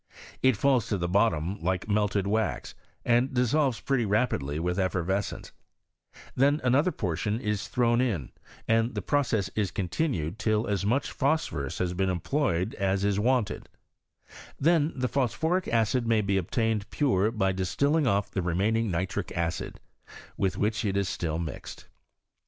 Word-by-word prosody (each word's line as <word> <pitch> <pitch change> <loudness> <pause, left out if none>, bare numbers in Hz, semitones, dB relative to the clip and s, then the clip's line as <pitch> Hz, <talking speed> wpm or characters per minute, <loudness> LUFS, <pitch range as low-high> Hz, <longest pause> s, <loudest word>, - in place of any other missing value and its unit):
It 130 -4 +4
falls 130 -2 +2
to 105 - -1
the 85 -1 -2
bottom 95 -2 +1
like 95 +2 -1
melted 105 -2 +1
wax, 110 0 -1 0.3
and 120 +2 +3
dissolves 125 0 +1
pretty 135 -1 0
rapidly 100 - 0
with 90 +3 -1
effervescence: 95 +1 -1 0.8
then 140 +3 +3
another 135 +8 +3
portion 105 - -2
is 105 -4 -2
thrown 120 -1 +2
in, 100 - -1 0.4
and 115 +2 +2
the - - -3
process 115 -9 +1
is 105 -3 0
continued 95 - -2
till 110 0 +1
as 100 -2 -1
much 125 +6 0
phosphorus 140 - -1
has 90 -1 -1
been 95 +1 0
employed 90 - 0
as 95 0 +1
is 100 0 +1
wanted; 120 -1 0 0.9
then 160 0 +3
the 130 -1 -1
phosphoric 140 +9 0
acid 115 +1 +1
may 115 -2 +3
be 100 -1 0
obtained 105 +3 0
pure 110 -8 +2
by 100 -4 0
dis 95 -1 -3
tilling 145 0 +2
off 100 -3 +1
the 95 - -1
remaining 100 +6 +1
nitric 90 +2 -2
acid 85 0 -3 0.6
with 95 -2 -1
which 110 +2 0
it 100 -2 0
is 100 -2 0
ftill 80 -1 -2
mixed. 80 -4 -7
105 Hz, 150 wpm, -27 LUFS, 95-125 Hz, 0.9 s, It